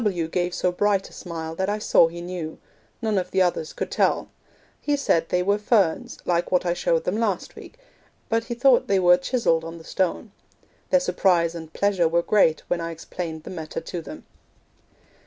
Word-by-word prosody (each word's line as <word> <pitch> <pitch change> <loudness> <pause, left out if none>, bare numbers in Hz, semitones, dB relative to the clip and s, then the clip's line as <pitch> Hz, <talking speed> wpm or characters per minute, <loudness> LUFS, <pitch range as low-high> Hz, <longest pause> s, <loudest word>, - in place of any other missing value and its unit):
W. 175 -6 0
gave 175 +1 -1
so 180 - +1
bright 200 +1 +1
a - - -16
smile 160 -2 -6
that 190 +4 -2
I 210 - 0
saw 210 -5 +4
he 170 +1 -8
knew; 175 -3 -5 0.5
none 215 -3 +1
of 180 0 -4
the 190 0 +3
others 170 -3 -1
could - - -5
tell; - - +1 0.5
he 290 -1 0
said 165 -12 +1
they 180 0 +1
were 200 +2 +1
ferns, 205 -6 +1
like 175 0 0
what 180 0 +2
I 175 - +1
showed 170 -1 0
them 185 +4 -1
last 205 -6 -1
week, - - -12 0.5
but 230 0 0
he 240 - -4
thought 250 +1 +4
they 195 - +3
were 180 -1 +6
chiselled 180 -6 +1
on 165 +1 -7
the 165 - -12
stone. 190 +5 -2 0.6
Their 275 - +5
surprise 180 -6 +2
and 160 -2 -8
pleasure 195 -3 +2
were 170 +1 +1
great 170 -7 +3
when 175 - -1
I 165 - -3
explained 165 -1 -6
the - - -8
matter 160 -3 -5
to 175 - -6
them. 305 - -10
180 Hz, 200 wpm, -24 LUFS, 165-205 Hz, 0.6 s, were